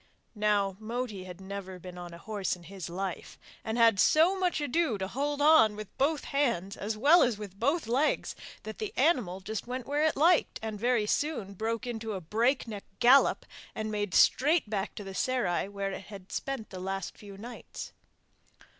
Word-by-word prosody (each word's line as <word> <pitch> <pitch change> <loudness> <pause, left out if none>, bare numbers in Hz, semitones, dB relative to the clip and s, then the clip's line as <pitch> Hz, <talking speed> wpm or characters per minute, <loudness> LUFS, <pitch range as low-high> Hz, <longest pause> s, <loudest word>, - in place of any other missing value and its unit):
Now 205 -3 +1
Moti 220 -3 -4
had 180 -1 -9
never 190 -1 -7
been 180 0 -10
on 175 -1 -8
a 170 - -9
horse 200 0 -2
in 175 - -16
his 185 -1 -7
life, 185 +1 -5 0.3
and 220 +1 -2
had 230 -4 +5
so 325 - +5
much 365 -3 0
ado 290 -4 +1
to 190 -1 -3
hold 285 +6 -1
on 300 -9 +6
with 210 -1 -9
both 290 +2 +2
hands 235 -9 0
as 215 +2 -3
well 295 +10 +6
as 240 -4 +2
with 200 -2 -9
both 285 +6 +1
legs 260 +7 +1 0.3
that 220 - -7
the 430 -1 -4
animal 245 - +2
went 190 0 -12
just 220 +1 -4
where 260 +4 -1
it 315 - +2
liked, 335 +3 +4
and 215 -2 -4
very 240 -1 +2
soon 225 -5 -1
broke 225 +4 -2
into 225 -2 -4
a 190 - -3
break 230 - +1
neck 210 -3 -7
gallop 255 +3 +5 0.3
and 215 0 -3
made 205 -3 -2
straight 300 +1 +4
back 205 -2 -3
to 205 - -6
the 195 -1 -7
serai 235 -6 0
where 200 -1 -3
it 190 - -7
had 195 -2 -11
spent 270 -5 -4
the 185 - -7
last 195 0 -4
few 200 -2 -11
nights. 235 +4 -8
220 Hz, 190 wpm, -30 LUFS, 195-265 Hz, 0.3 s, on